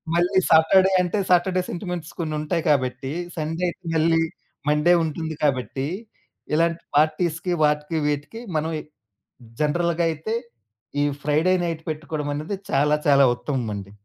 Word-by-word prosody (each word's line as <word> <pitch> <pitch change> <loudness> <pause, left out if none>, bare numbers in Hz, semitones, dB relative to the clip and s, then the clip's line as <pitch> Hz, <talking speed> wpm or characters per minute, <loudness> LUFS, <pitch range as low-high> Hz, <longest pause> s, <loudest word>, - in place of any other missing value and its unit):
మళ్ళీ 180 +3 +3
సాటర్‌డే 185 +4 +6
అంటే 180 +3 -1
Saturday 185 +1 +3
sentiments 175 -2 -5
కొన్నుం‌టాయి 155 +1 -1
కాబట్టి, 130 -1 0 0.2
సండే 165 +2 -3
అయితే 175 +1 -6
మళ్ళీ 165 +1 +3 0.5
మండే 150 +4 +4
ఉంటుంది 160 0 -3
కాబట్టి, 135 -1 0 0.7
ఇలాంటి 165 +1 +1
పార్టీస్‌కి 160 +3 +1
వాటికి 150 +2 +1
వీటికి 150 +10 -3 0.2
మనవి 155 +1 -1 0.8
జనరల్‌గయితే 165 +4 0 0.7
ఈ - - +3 0.2
ఫ్రైడే 155 +5 +2
నైట్ 165 -1 -3
పెట్టుకోవడమనేది 155 +2 -3 0.2
చాలా 150 +2 +3
చాలా 140 -1 +6
ఉత్తమమండి. 110 -8 -4
160 Hz, 110 wpm, -23 LUFS, 150-170 Hz, 0.8 s, సాటర్‌డే